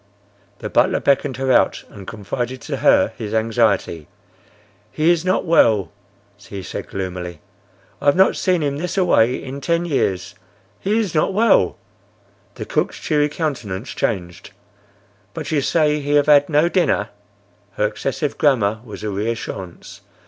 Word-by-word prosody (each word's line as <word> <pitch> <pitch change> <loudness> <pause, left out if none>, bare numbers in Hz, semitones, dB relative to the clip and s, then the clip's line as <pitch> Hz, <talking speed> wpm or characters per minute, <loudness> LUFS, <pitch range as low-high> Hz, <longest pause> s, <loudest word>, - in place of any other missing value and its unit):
The - - -6
butler - - +3
beckoned 135 -2 +1
her 135 0 0
out - - +2
and 100 -3 -12
confided 120 +4 -4
to - - -4
her - - +3
his 110 -1 -4
anxiety. 110 -8 0 0.8
"He 160 +3 +2
is 170 -1 +1
not 185 +1 0
well," 110 - +3 0.5
he 100 -1 -9
said - - -6
gloomily. 90 -3 -5 0.6
"I - - -7
have 145 - +5
not 190 +1 +4
see 185 - +1
him 145 -3 -1
this 180 +5 -4
a 185 - +3
way 120 -5 +3
in 135 +1 -7
ten 170 +3 0
years. 95 - -1 0.5
He 205 +3 0
is 215 -6 -1
not 155 +4 +1
well." 230 +2 +3 0.8
The - - -6
cook's - - -1
cheery 150 -1 +1
countenance 130 - -4
changed. 90 -6 -3 0.8
"But - - -5
you 150 -2 +2
say 150 +1 +2
he 145 0 -2
have 145 -1 +4
had 145 -1 +5
no 155 +2 +3
dinner." 180 0 +1 0.6
Her 105 - 0
excessive 135 +7 -3
grammar 110 -7 +2
was 110 -3 -10
a 105 - -2
reassurance. 100 -3 -5
135 Hz, 155 wpm, -20 LUFS, 105-155 Hz, 0.8 s, have